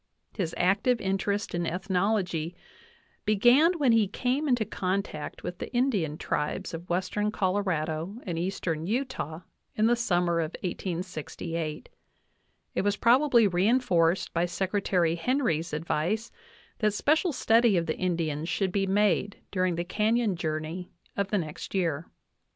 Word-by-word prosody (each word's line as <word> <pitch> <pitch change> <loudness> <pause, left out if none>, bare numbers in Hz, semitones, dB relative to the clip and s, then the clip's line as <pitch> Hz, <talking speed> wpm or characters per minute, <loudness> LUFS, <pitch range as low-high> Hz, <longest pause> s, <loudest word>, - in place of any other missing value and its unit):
His 170 -5 -2
active 205 +7 +2
interest 200 +1 -1
in 175 -1 -1
ethnology 180 -2 0 0.7
began 245 - +5
when 275 -6 +3
he 225 -3 +4
came 255 +8 -1
into 245 -5 +2
contact 190 -5 -3
with 180 - -5
the - - -6
Indian 205 - +1
tribes 165 +6 -2
of 165 +2 -7
western 185 +4 0
Colorado 185 -3 -1
and 170 -4 -3
eastern 170 -3 -2
Utah 220 - -2 0.3
in 215 - +2
the 240 +1 +4
summer 175 -7 +1
of 160 0 -2
1868^! 170 -3 -4 0.9
it - - 0
was 205 +1 +1
probably 240 -1 +5
reinforced 185 -3 +2
by 170 +1 +1
Secretary 185 -2 +1
Henry's 170 - 0
advice 170 +8 -1 0.5
that 210 -2 +1
special 315 - +2
study 230 -5 +4
of 170 - +1
the 155 - -1
Indians 165 -3 -1
should 190 +1 0
be 195 0 0
made 200 0 +2
during 185 -2 +1
the 170 - -1
canyon 215 +2 +1
journey 160 +2 -3 0.3
of 200 -1 0
the 205 - 0
next 160 +1 -5
year. 165 -4 0
185 Hz, 135 wpm, -28 LUFS, 170-215 Hz, 0.9 s, began